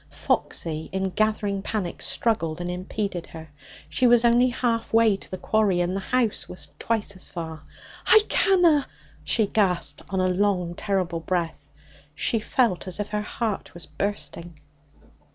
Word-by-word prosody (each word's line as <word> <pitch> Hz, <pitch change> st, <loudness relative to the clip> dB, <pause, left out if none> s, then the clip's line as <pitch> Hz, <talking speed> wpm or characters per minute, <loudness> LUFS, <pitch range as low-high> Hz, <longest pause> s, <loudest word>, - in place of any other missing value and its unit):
Foxy, 160 Hz, -1 st, -1 dB
in 190 Hz, 0 st, -1 dB
gathering 210 Hz, -1 st, 0 dB
panic, 195 Hz, -4 st, -3 dB
struggled 170 Hz, -9 st, 0 dB
and 175 Hz, 0 st, -3 dB
impeded 185 Hz, 0 st, -4 dB
her. 160 Hz, -2 st, -11 dB, 0.4 s
She 255 Hz, -, +2 dB
was 240 Hz, 0 st, +5 dB
only 240 Hz, +2 st, +5 dB
half 235 Hz, -2 st, -1 dB
way 225 Hz, -2 st, +5 dB
to 195 Hz, -, -11 dB
the 185 Hz, -, -5 dB
quarry, 210 Hz, -4 st, +2 dB
and 175 Hz, +1 st, 0 dB
the -, -, -1 dB
house 235 Hz, +1 st, 0 dB
was 180 Hz, -, -9 dB
twice 220 Hz, -3 st, -1 dB
as 185 Hz, -, -6 dB
far. 160 Hz, -3 st, -6 dB, 0.5 s
'I 435 Hz, -, +8 dB
canna!' 345 Hz, -7 st, +4 dB, 0.4 s
she 220 Hz, -, +3 dB
gasped 195 Hz, -4 st, 0 dB
on 190 Hz, -, -1 dB
a 185 Hz, -, +3 dB
long 180 Hz, -2 st, +1 dB
terrible 180 Hz, -3 st, -1 dB
breath. 165 Hz, -4 st, -3 dB, 0.5 s
She 225 Hz, -, +1 dB
felt 215 Hz, -4 st, +1 dB
as 185 Hz, +2 st, -3 dB
if 205 Hz, -, -3 dB
her 210 Hz, 0 st, -1 dB
heart 210 Hz, -3 st, -3 dB
was 175 Hz, -, -8 dB
bursting. 170 Hz, -1 st, -4 dB
195 Hz, 155 wpm, -25 LUFS, 175-225 Hz, 0.5 s, I